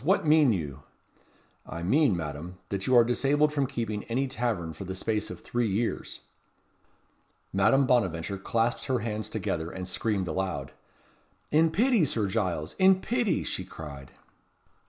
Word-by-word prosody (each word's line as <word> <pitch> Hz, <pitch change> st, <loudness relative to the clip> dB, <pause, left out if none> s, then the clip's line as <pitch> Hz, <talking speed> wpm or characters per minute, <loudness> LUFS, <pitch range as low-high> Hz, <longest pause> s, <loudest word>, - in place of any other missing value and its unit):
what 185 Hz, +3 st, +2 dB
mean 150 Hz, -4 st, +5 dB
you?" 75 Hz, -8 st, -3 dB, 0.8 s
"I 85 Hz, -, -7 dB
mean, 130 Hz, -, +3 dB
Madame, 80 Hz, +3 st, -6 dB
that 100 Hz, -1 st, -3 dB
you 130 Hz, -, +4 dB
are 120 Hz, -, +8 dB
disabled 140 Hz, +5 st, +2 dB
from 140 Hz, -3 st, +1 dB
keeping 115 Hz, -5 st, -3 dB
any 130 Hz, +4 st, 0 dB
tavern 110 Hz, -11 st, -2 dB
for 80 Hz, -, -8 dB
the 95 Hz, 0 st, -5 dB
space 110 Hz, +2 st, -1 dB
of -, -, -8 dB
three 120 Hz, -1 st, -1 dB
years." 110 Hz, +4 st, -2 dB, 1.3 s
Madame 115 Hz, +8 st, +4 dB
Bonaventure 100 Hz, -6 st, +1 dB
clasped 115 Hz, +4 st, 0 dB
her 130 Hz, -2 st, +1 dB
hands 110 Hz, -1 st, -3 dB
together, 85 Hz, -6 st, -2 dB
and 90 Hz, 0 st, -6 dB
screamed 100 Hz, -1 st, -1 dB
aloud. 85 Hz, -5 st, -3 dB, 0.8 s
"In 160 Hz, +2 st, +4 dB
pity, 230 Hz, +3 st, +3 dB
Sir 115 Hz, -8 st, 0 dB
Giles! 90 Hz, -7 st, -1 dB
In 190 Hz, 0 st, +6 dB
pity!" 240 Hz, -1 st, 0 dB
she -, -, -3 dB
cried. 70 Hz, -4 st, -9 dB
110 Hz, 150 wpm, -28 LUFS, 90-135 Hz, 1.3 s, are